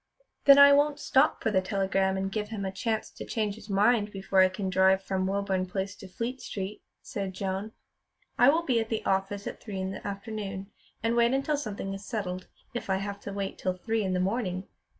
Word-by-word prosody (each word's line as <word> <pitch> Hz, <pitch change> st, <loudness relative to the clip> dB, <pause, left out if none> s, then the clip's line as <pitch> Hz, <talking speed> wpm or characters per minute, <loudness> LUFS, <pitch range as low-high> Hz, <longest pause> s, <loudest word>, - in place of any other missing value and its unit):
"Then 280 Hz, -1 st, +9 dB
I 280 Hz, 0 st, +9 dB
won't 290 Hz, +1 st, +3 dB
stop 270 Hz, +2 st, +3 dB
for 220 Hz, -, +2 dB
the 190 Hz, -2 st, +3 dB
telegram 190 Hz, 0 st, 0 dB
and 195 Hz, 0 st, -2 dB
give 210 Hz, 0 st, -3 dB
him 210 Hz, -3 st, -4 dB
a 190 Hz, -, -2 dB
chance 220 Hz, +3 st, -2 dB
to -, -, -8 dB
change 215 Hz, -3 st, -1 dB
his 215 Hz, 0 st, -13 dB
mind 210 Hz, +1 st, +3 dB
before 195 Hz, -1 st, 0 dB
I 185 Hz, 0 st, +7 dB
can 190 Hz, +1 st, -4 dB
drive 190 Hz, 0 st, +4 dB
from 190 Hz, -1 st, -1 dB
Woburn 195 Hz, -1 st, 0 dB
Place 190 Hz, +1 st, -3 dB
to 195 Hz, -, -10 dB
Fleet 235 Hz, +7 st, -4 dB
Street," 200 Hz, +1 st, -5 dB, 0.2 s
said 195 Hz, -2 st, -4 dB
Joan. 195 Hz, +3 st, -3 dB, 0.6 s
"I 245 Hz, -, +6 dB
will 325 Hz, +4 st, +3 dB
be 250 Hz, -5 st, +2 dB
at 225 Hz, 0 st, -2 dB
the 220 Hz, -, -2 dB
office 195 Hz, +1 st, 0 dB
at -, -, -6 dB
three 200 Hz, -4 st, -5 dB
in 190 Hz, 0 st, -2 dB
the 195 Hz, -, -6 dB
afternoon, 200 Hz, -1 st, -5 dB, 0.3 s
and 230 Hz, +1 st, +1 dB
wait 235 Hz, +1 st, +4 dB
until 285 Hz, +3 st, +1 dB
something 205 Hz, -7 st, -4 dB
is 195 Hz, +1 st, -7 dB
settled, 185 Hz, -5 st, -4 dB, 0.3 s
if 240 Hz, -, -5 dB
I 190 Hz, -, +3 dB
have 200 Hz, +1 st, -4 dB
to 200 Hz, -, -7 dB
wait 195 Hz, -1 st, -4 dB
till 185 Hz, -1 st, -1 dB
three 225 Hz, +4 st, -1 dB
in 190 Hz, -1 st, -1 dB
the 180 Hz, -, +1 dB
morning." 190 Hz, -1 st, -1 dB
200 Hz, 220 wpm, -28 LUFS, 190-225 Hz, 0.6 s, Then